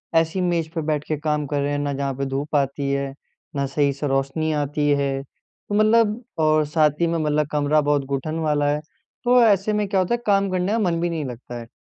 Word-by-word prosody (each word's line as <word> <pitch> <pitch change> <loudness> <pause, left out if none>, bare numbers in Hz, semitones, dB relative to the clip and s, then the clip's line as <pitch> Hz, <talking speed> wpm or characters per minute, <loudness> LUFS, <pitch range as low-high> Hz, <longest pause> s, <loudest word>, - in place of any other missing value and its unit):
ऐसी 165 +3 +2
मेज़ 170 -3 0
पे 160 - 0
बैठ 150 -2 0
के 155 - -1
काम 150 -1 -1
कर 145 0 -1
रहे 140 +1 -1
हैं 145 - -1
ना, 145 -1 -1
जहाँ 140 0 -2
पे 140 +1 -2
धूप 140 +3 -3
आती 140 0 0
है, 140 0 -2 0.4
ना 140 -1 0
सही 140 +1 +1
से 145 +2 -3
रोशनी 135 +3 0
आती 145 0 0
है। 140 -1 +1 0.5
तो 205 - -1
मतलब 215 +2 +3 0.2
और 155 -1 +3
साथ 150 0 +2
ही 170 - +4
में 165 0 0
मतलब 150 -1 +1
कमरा 150 +1 +2
बहुत 145 -1 +1
घुटन 140 +4 -3
वाला 150 -2 +1
है 145 +1 0 0.4
तो 250 0 +5
ऐसे 205 0 +3
में 210 -1 0
क्या 195 -1 +1
होता 185 +5 +1
है 240 - -7
काम 200 -1 +3
करने 185 +1 0
का 225 - +1
मन 175 -5 +1
भी 175 - 0
नहीं 160 -3 -3
लगता 120 -1 -7
है। 115 - -9
150 Hz, 240 wpm, -22 LUFS, 140-175 Hz, 0.5 s, तो